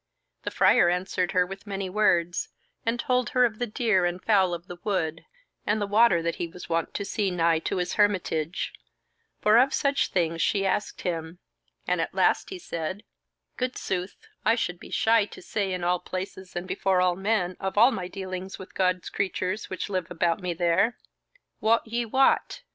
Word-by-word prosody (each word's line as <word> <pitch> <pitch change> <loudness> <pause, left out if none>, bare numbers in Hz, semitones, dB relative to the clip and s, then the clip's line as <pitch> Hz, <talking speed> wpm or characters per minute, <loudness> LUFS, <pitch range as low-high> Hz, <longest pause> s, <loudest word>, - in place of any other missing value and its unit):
The - - -3
Friar 175 - +5
answered 180 0 -1
her 180 -1 +4
with 195 +3 -9
many 195 -1 -3
words, 180 -3 +1 0.4
and 235 +1 +1
told 250 0 +1
her 250 - +7
of 220 -2 -2
the 245 - -1
deer 215 -4 +1
and 175 +1 0
fowl 190 -4 +3
of 170 0 -10
the 175 -1 -9
wood 165 -6 -1 0.4
and 210 +1 +1
the 205 - 0
water 205 -4 +4
that 170 0 -1
he 170 - -2
was 180 +2 -10
wont 165 -1 -1
to 200 - -2
see 205 0 0
nigh 165 -2 +2
to 165 - -2
his 180 -1 -1
hermitage; 185 -5 0 0.7
for 215 +2 +6
of 270 +2 +3
such 280 -1 +1
things 165 -2 0
she 195 -1 +1
asked 195 +2 -1
him, 165 -1 -3 0.5
and - - +1
at - - -4
last - - +2
he 380 - -6
said: 185 - -5 0.5
"Good 255 0 -2
sooth, 185 0 -3 0.3
I 225 +1 +4
should 180 -7 -2
be - - -11
shy 225 -1 +3
to - - -12
say 195 +1 -2
in 180 -1 -3
all 180 +1 +2
places 185 0 -6
and 175 +1 -4
before 190 0 +1
all 180 -1 +3
men 190 -2 0
of 190 +1 -3
all 235 +5 +7
my 185 -7 -3
dealings 185 0 -6
with 190 - -11
God's 185 -1 0
creatures 195 +1 -2
which 185 - -4
live 185 -4 -2
about 170 +1 0
me 180 -2 -2
there. 175 +7 +2 0.6
Wot 225 +2 +3
ye 235 +1 -2
what? 265 - +2
190 Hz, 195 wpm, -26 LUFS, 175-215 Hz, 0.7 s, her